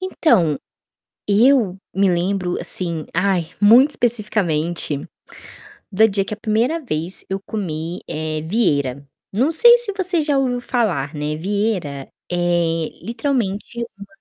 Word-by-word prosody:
Então, 225 - +2 0.7
eu 215 -3 +4 0.2
me 195 0 +3
lembro 180 +1 0
assim 170 -2 -3
ai, 180 -3 +1
muito 240 +8 +7
especificamente, 175 - -1 0.9
da 215 +3 +5
dia 195 -2 0
que - - -8
a - - -15
primeira 225 +10 0
vez 170 - -2
eu 195 - -2
comi, 170 -4 -4
eh, 155 0 -3
Vieira. 145 - 0 0.3
Não 260 +10 +2
sei 475 +9 +7
se 475 -4 -1
você 365 -3 0
já 290 -2 +1
ouviu 250 -2 0
falar, 180 - -1
né, 150 +1 -3
Vieira 185 -7 -2 0.2
é 175 -2 0 0.2
literalmente 235 -2 -2
uma 200 - -9
195 Hz, 125 wpm, -20 LUFS, 165-235 Hz, 0.9 s, muito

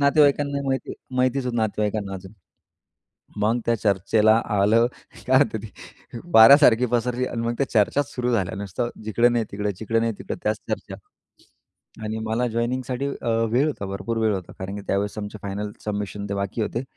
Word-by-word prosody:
नातेवाईकांना 140 -1 +3
माहिती 135 0 -2 0.2
माहितच 130 +1 +1
होत 125 - -2
नातेवाईकांना 105 -2 -1
अजून. 95 +1 -9 1.1
मग 115 +3 +2
त्या 115 - +3
चर्चेला 105 +2 +3
आलं 105 +3 +3 0.4
काय 130 +2 +5
तरी 110 0 -5 0.7
वाऱ्यासारखी 125 +1 +8
पसरली 125 +1 0
आणि 115 -2 -3
मग 120 0 -1
त्या 140 - 0
चर्चाच 130 +6 +2
सुरू 125 -1 -1
झाल्या 95 -6 0
नुसतं 100 +4 -3 0.2
जिकडं 120 +3 +3
नाही 120 -2 +1
तिकडे, 105 0 -2
जिकडे 110 +4 -1
नाही 115 0 0
तिकडे 95 - -5
त्याच 105 0 0
चर्चा. - - -4 1.1
आणि 110 +1 -3
मला 115 +3 0
जॉइनिंगसाठी 125 +3 -2 0.2
अ, - - -2 0.2
वेळ 135 +5 +3
होता 120 -10 -3
भरपूर 100 +4 -4
वेळ 110 -2 +2
होता. 95 -3 -6
कारण 95 +1 -5
की 100 - -6
त्यावेळेस 100 +2 -1
आमचे 105 +1 -6
फायनल 100 +1 -4
सबमिशन 105 -1 -4
ते 100 - -2
बाकी 100 +3 -2
होते. 115 +3 -2
110 Hz, 165 wpm, -23 LUFS, 100-125 Hz, 1.1 s, वाऱ्यासारखी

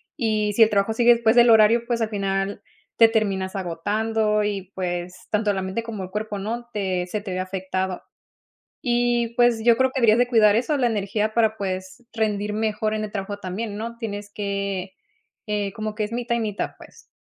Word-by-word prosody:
y, 215 -6 0
si 225 - +6
el 220 - +4
trabajo 205 +1 +1
sigue 240 +1 +6
después 230 0 +2
del 240 0 +7
horario, 225 +1 +6
pues, 235 -1 -1
al 220 - 0
final, 195 -1 -2 0.4
te 230 - +8
terminas 200 -4 -1
agotando 210 +4 0
y, 200 -2 -3
pues, 180 -1 -3 0.2
tanto 210 -1 +1
la 190 - -2
mente, 190 +4 -3
como 220 -4 -6
el 185 - -8
cuerpo, 210 0 -3
¿no?, 235 +4 -4
te 185 -3 -1
se 210 +3 -3
te 200 -2 -6
ve 185 - -2
afectado. 185 0 -3 0.9
Y 240 -1 +1
pues, 240 -2 +3
yo 235 -1 +6
creo 260 +2 +2
que, 265 - -3
habrías 225 -2 +5
de 245 0 +3
cuidar 215 -4 +5
eso 250 +7 0
de - - 0
la 250 - +2
energía 215 -1 -1
para, 220 -2 +2
pues, 190 +3 -5
rendir 210 -2 -1
mejor 215 0 -1
en 215 - -2
el 210 - -6
trabajo 200 0 -4
también, 205 +2 -5
¿no? 230 +2 -5
Tienes 205 -3 -5
que, 200 -2 -3 0.5
eh, 205 -2 -2
como 215 +1 -4
que 215 0 -1
es 210 - -6
mitad 235 0 -1
y - - -1
mitad, 210 -2 -3
pues, 460 - -16
210 Hz, 205 wpm, -23 LUFS, 195-230 Hz, 0.9 s, te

